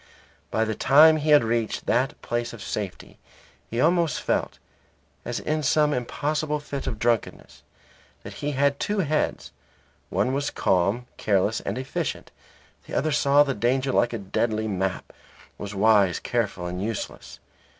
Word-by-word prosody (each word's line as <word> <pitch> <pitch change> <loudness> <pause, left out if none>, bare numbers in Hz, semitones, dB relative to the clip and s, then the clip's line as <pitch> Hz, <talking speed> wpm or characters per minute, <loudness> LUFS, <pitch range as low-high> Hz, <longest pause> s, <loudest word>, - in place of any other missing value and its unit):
By 110 - +1
the 110 - -2
time 155 +7 +6
he 155 0 -2
had 150 -4 +7
reached 115 -1 -1
that 130 +4 0
place 120 0 -2
of 115 - -9
safety 100 -3 -6 0.5
he 115 - -3
almost 165 0 +2
felt - - -1 0.7
(as - - -3
in 155 0 -1
some 150 +1 +2
impossible 150 +4 -2
fit 145 -1 -6
of 110 - -3
drunkenness) 115 0 -2 0.6
that - - -8
he 145 0 -2
had 140 +1 +1
two 205 -1 0
heads; 155 -2 -1 0.6
one 105 +8 0
was 145 +1 -1
calm, 100 +7 +1
careless, 105 +1 +1
and 100 - -4
efficient; 130 +1 -4 0.6
the - - -6
other 155 - +1
saw 145 0 +4
the 140 -2 -2
danger 130 +4 0
like 120 - +2
a 115 - -3
deadly 110 +2 -1
map, 95 -2 -3 0.5
was 100 0 -6
wise, 100 -3 +4
careful, 105 -7 -2
and 90 +1 -4
useless. 110 0 -5
120 Hz, 150 wpm, -25 LUFS, 105-145 Hz, 0.7 s, had